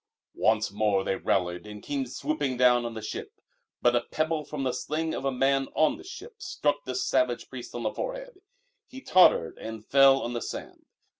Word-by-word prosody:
Once 110 Hz, -1 st, +3 dB
more 100 Hz, -2 st, +1 dB
they 95 Hz, -, 0 dB
rallied 90 Hz, -1 st, -1 dB
and 105 Hz, -1 st, -9 dB
came 140 Hz, -2 st, -2 dB
swooping 140 Hz, 0 st, -2 dB
down 125 Hz, -1 st, +4 dB
on 115 Hz, -1 st, -5 dB
the 110 Hz, -, -6 dB
ship. 110 Hz, -, -6 dB, 0.5 s
But 120 Hz, 0 st, +4 dB
a 120 Hz, -, +3 dB
pebble 155 Hz, +4 st, -2 dB
from 145 Hz, -1 st, -5 dB
the 130 Hz, -, +1 dB
sling 160 Hz, +1 st, -2 dB
of -, -, -4 dB
a 135 Hz, -, +2 dB
man 135 Hz, +1 st, +1 dB
on 155 Hz, -1 st, +3 dB
the -, -, -12 dB
ship 410 Hz, +4 st, -11 dB
struck 150 Hz, -, -1 dB
the 130 Hz, -, -4 dB
savage 125 Hz, -1 st, 0 dB
priest 125 Hz, -2 st, -8 dB
on 120 Hz, -, -4 dB
the 110 Hz, -, -1 dB
forehead; -, -, -6 dB, 0.5 s
he 260 Hz, -, -10 dB
tottered 180 Hz, -, +4 dB
and 110 Hz, -1 st, -7 dB
fell 135 Hz, 0 st, +6 dB
on 120 Hz, -, -3 dB
the 120 Hz, -, -3 dB
sand. -, -, -7 dB
130 Hz, 200 wpm, -27 LUFS, 115-155 Hz, 0.5 s, fell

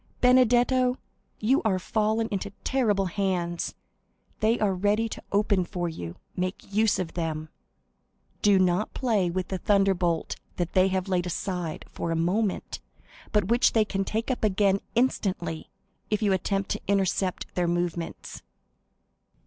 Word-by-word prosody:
Benedetto, 250 Hz, 0 st, +4 dB, 0.4 s
you 255 Hz, +6 st, +3 dB
are 205 Hz, -5 st, +1 dB
fallen 220 Hz, +4 st, 0 dB
into 200 Hz, 0 st, -2 dB
terrible 210 Hz, -7 st, +1 dB
hands; 180 Hz, -3 st, -1 dB, 0.6 s
they 220 Hz, +2 st, +2 dB
are 205 Hz, -3 st, +2 dB
ready 205 Hz, +4 st, +1 dB
to -, -, -7 dB
open 200 Hz, -2 st, +2 dB
for 175 Hz, 0 st, -3 dB
you—make 180 Hz, -, -6 dB
use 215 Hz, 0 st, +3 dB
of 180 Hz, -3 st, -3 dB
them. 160 Hz, -2 st, -3 dB, 0.9 s
Do 205 Hz, -1 st, +5 dB
not 185 Hz, +2 st, +1 dB
play 215 Hz, -9 st, +1 dB
with 185 Hz, +1 st, -3 dB
the 190 Hz, -, -2 dB
thunderbolt 190 Hz, -4 st, +1 dB, 0.2 s
they 185 Hz, +2 st, +2 dB
have 190 Hz, 0 st, -1 dB
laid 180 Hz, -2 st, 0 dB
aside 180 Hz, -1 st, -3 dB
for -, -, -5 dB
a 165 Hz, -, 0 dB
moment, 185 Hz, +5 st, -1 dB, 0.5 s
but 210 Hz, -2 st, +1 dB
which 240 Hz, +2 st, +4 dB
they 220 Hz, -2 st, +4 dB
can 195 Hz, -1 st, -1 dB
take 220 Hz, +6 st, -2 dB
up 250 Hz, -, -3 dB
again 200 Hz, -1 st, +3 dB, 0.2 s
instantly, 185 Hz, -9 st, 0 dB, 0.4 s
if 215 Hz, 0 st, 0 dB
you 200 Hz, -2 st, +3 dB
attempt 195 Hz, +1 st, -1 dB
to -, -, -2 dB
intercept 190 Hz, -1 st, 0 dB
their 180 Hz, -1 st, 0 dB
movements." 175 Hz, -1 st, -3 dB
195 Hz, 140 wpm, -27 LUFS, 180-215 Hz, 0.9 s, Do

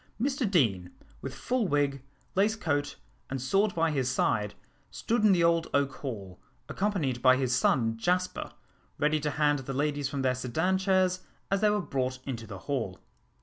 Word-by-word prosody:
Mr 265 Hz, -2 st, 0 dB
Deane, 105 Hz, -, +2 dB, 0.3 s
with -, -, -6 dB
full 250 Hz, -5 st, 0 dB
wig, 145 Hz, -3 st, +1 dB, 0.3 s
lace 205 Hz, +3 st, +2 dB
coat, 145 Hz, -8 st, -1 dB, 0.3 s
and 135 Hz, -, -3 dB
sword 195 Hz, -, +1 dB
by 165 Hz, -1 st, +2 dB
his 130 Hz, -4 st, 0 dB
side, 105 Hz, -4 st, 0 dB, 0.3 s
stood 235 Hz, 0 st, -1 dB
in 210 Hz, -, +6 dB
the 175 Hz, -3 st, +3 dB
old 170 Hz, 0 st, +3 dB
oak 140 Hz, -1 st, +1 dB
hall, 100 Hz, -9 st, -6 dB, 0.3 s
accompanied 155 Hz, -, -1 dB
by 130 Hz, 0 st, +6 dB
his 130 Hz, -2 st, +1 dB
son 115 Hz, -3 st, +2 dB
Jasper, 180 Hz, +7 st, -1 dB, 0.5 s
ready 150 Hz, +1 st, +2 dB
to 150 Hz, 0 st, -1 dB
hand 145 Hz, 0 st, +2 dB
the 135 Hz, +1 st, -5 dB
ladies 145 Hz, 0 st, -1 dB
from 140 Hz, -2 st, -3 dB
their 130 Hz, -1 st, +3 dB
sedan 160 Hz, +10 st, 0 dB
chairs 185 Hz, -1 st, +2 dB, 0.3 s
as 195 Hz, -, +2 dB
they 215 Hz, -, +5 dB
were 210 Hz, 0 st, +2 dB
brought 130 Hz, -5 st, -2 dB
into 115 Hz, -5 st, -5 dB
the 100 Hz, -2 st, -7 dB
hall. 115 Hz, -10 st, -2 dB
145 Hz, 175 wpm, -29 LUFS, 130-185 Hz, 0.5 s, in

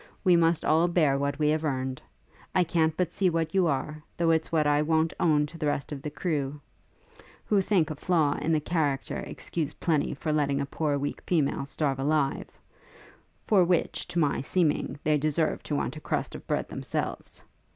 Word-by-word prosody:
We 180 Hz, -3 st, +5 dB
must 165 Hz, -1 st, +2 dB
all 160 Hz, +3 st, +4 dB
bear 160 Hz, -6 st, +3 dB
what 140 Hz, 0 st, -1 dB
we 150 Hz, -1 st, +2 dB
have 155 Hz, +1 st, +1 dB
earned. 130 Hz, -3 st, -2 dB, 0.5 s
I 185 Hz, -, +5 dB
can't 160 Hz, -2 st, +1 dB
but 180 Hz, -2 st, -1 dB
see 190 Hz, -2 st, +2 dB
what 165 Hz, -1 st, -1 dB
you 190 Hz, -3 st, +3 dB
are, 150 Hz, +1 st, -2 dB, 0.2 s
though 170 Hz, -1 st, +3 dB
it's 160 Hz, 0 st, 0 dB
what 155 Hz, -2 st, +2 dB
I 145 Hz, 0 st, +3 dB
won't 160 Hz, +1 st, +1 dB
own 150 Hz, -3 st, +3 dB
to 165 Hz, +3 st, -11 dB
the 155 Hz, -, 0 dB
rest 145 Hz, 0 st, -2 dB
of 140 Hz, -2 st, -5 dB
the 150 Hz, -, -4 dB
crew, 150 Hz, -2 st, -2 dB, 0.9 s
who 205 Hz, -2 st, +3 dB
think 185 Hz, -6 st, +1 dB
a -, -, -4 dB
flaw 155 Hz, -2 st, +1 dB
in 155 Hz, +3 st, 0 dB
the 155 Hz, -, +3 dB
character 145 Hz, -4 st, -1 dB
excuse 155 Hz, -3 st, -4 dB
plenty 155 Hz, -5 st, 0 dB
for 155 Hz, +2 st, -2 dB
letting 140 Hz, -2 st, +1 dB
a 140 Hz, -, -1 dB
poor 145 Hz, 0 st, -1 dB
weak 145 Hz, +1 st, -3 dB
female 145 Hz, -5 st, +1 dB
starve 140 Hz, -2 st, -1 dB
alive; 140 Hz, 0 st, 0 dB, 1.0 s
for 200 Hz, -4 st, +4 dB
which, 175 Hz, -1 st, 0 dB
to -, -, -5 dB
my 150 Hz, -6 st, +2 dB
seeming, 150 Hz, -2 st, 0 dB
they 150 Hz, -1 st, +2 dB
deserve 155 Hz, +2 st, 0 dB
to 150 Hz, -, -3 dB
want 145 Hz, -, -2 dB
a -, -, -9 dB
crust -, -, -2 dB
of -, -, -10 dB
bread -, -, -1 dB
themselves. -, -, -5 dB
155 Hz, 195 wpm, -27 LUFS, 145-165 Hz, 1.0 s, We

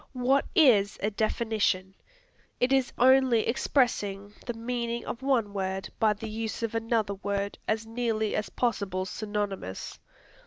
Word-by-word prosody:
What 260 Hz, +2 st, +2 dB
is 230 Hz, -, +5 dB
a 210 Hz, -, +1 dB
definition? 215 Hz, -3 st, 0 dB, 0.7 s
It 250 Hz, +2 st, +2 dB
is 265 Hz, -2 st, +2 dB
only 260 Hz, -2 st, +5 dB
expressing 210 Hz, -5 st, 0 dB
the 240 Hz, -, -3 dB
meaning 235 Hz, 0 st, -3 dB
of 235 Hz, -, -5 dB
one 245 Hz, -7 st, +1 dB
word 190 Hz, -1 st, -3 dB
by 215 Hz, -1 st, +4 dB
the 215 Hz, +2 st, -7 dB
use 220 Hz, +1 st, -4 dB
of 230 Hz, -, -2 dB
another 225 Hz, -2 st, 0 dB
word 200 Hz, 0 st, -3 dB
as 220 Hz, +1 st, 0 dB
nearly 225 Hz, -2 st, -1 dB
as 215 Hz, -, -2 dB
possible 200 Hz, -6 st, -1 dB
synonymous. 205 Hz, -, -4 dB
220 Hz, 140 wpm, -28 LUFS, 200-240 Hz, 0.7 s, is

